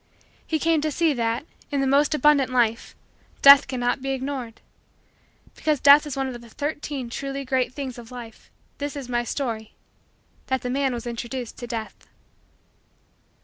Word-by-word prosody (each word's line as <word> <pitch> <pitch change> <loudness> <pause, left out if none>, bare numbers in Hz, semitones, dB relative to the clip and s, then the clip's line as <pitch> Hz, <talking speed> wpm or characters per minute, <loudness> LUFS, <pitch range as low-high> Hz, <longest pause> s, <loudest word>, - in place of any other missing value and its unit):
He 320 - 0
came 325 0 +2
to 310 - 0
see 320 +1 +1
that, 230 +1 -1 0.2
in 285 - -1
the 275 - +1
most 285 +3 +3
abundant 290 -2 +4
life, 230 -3 0 0.5
Death 280 0 +9
cannot 255 0 -1
be 270 - -4
ignored. 260 -3 -5 0.9
Because 305 -3 0
Death 285 +2 +7
is 280 -2 -5
one 270 0 0
of 245 -2 -7
the 235 - -14
Thirteen 290 -1 -4
Truly 275 +3 -5
Great 255 -1 0
Things 260 -2 -6
of 230 -1 -11
Life, 240 -3 -11 0.3
this 285 0 -4
is 275 -3 -6
my 240 -1 0
story: 230 -4 -4 0.7
that 260 0 -1
the 250 - -2
man 270 0 +1
was 235 0 -6
introduced 240 +1 -5
to 240 - -6
Death. 225 -2 -6
265 Hz, 165 wpm, -24 LUFS, 240-285 Hz, 0.9 s, Death